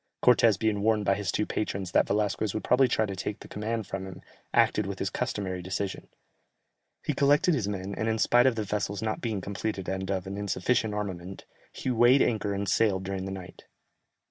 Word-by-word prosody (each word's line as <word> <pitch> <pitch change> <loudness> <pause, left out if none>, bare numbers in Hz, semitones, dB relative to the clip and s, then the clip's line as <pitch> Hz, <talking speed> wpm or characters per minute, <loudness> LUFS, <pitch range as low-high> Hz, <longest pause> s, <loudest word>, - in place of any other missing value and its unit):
Cortès 115 -4 +5
being 105 -1 0
warned 105 -1 +2
by 100 - +4
his 100 -1 -2
two 105 - 0
patrons 95 -4 -3
that - - +3
Velasquez 105 0 0
would 110 - -2
probably 125 +1 +4
try 110 - +1
to 100 -2 -5
take 100 +2 -4
the - - -10
command 110 +1 -3
from 95 0 -5
him, 95 - -10 0.3
acted - - +3
with - - -4
his - - -2
customary 95 -3 -3
decision; 95 +2 -4 1.0
he - - 0
collected 145 +5 +3
his 120 -9 0
men 100 -1 -4
and, 110 +2 -1
in 110 - +1
spite 120 +3 +4
of 130 - +2
the 110 - -1
vessels 100 0 -2
not 110 -1 -2
being 110 -5 -2
completed 100 0 -4
and 95 0 -3
of 95 -2 -1
an 100 +1 -5
insufficient 105 +3 0
armament, 95 -3 -5 0.3
he 130 - -3
weighed 120 +3 +5
anchor 105 -3 0
and 100 0 -2
sailed 95 -3 +2
during 95 -1 -4
the 95 - -4
night. 95 -2 -9
105 Hz, 205 wpm, -28 LUFS, 95-110 Hz, 1.0 s, Cortès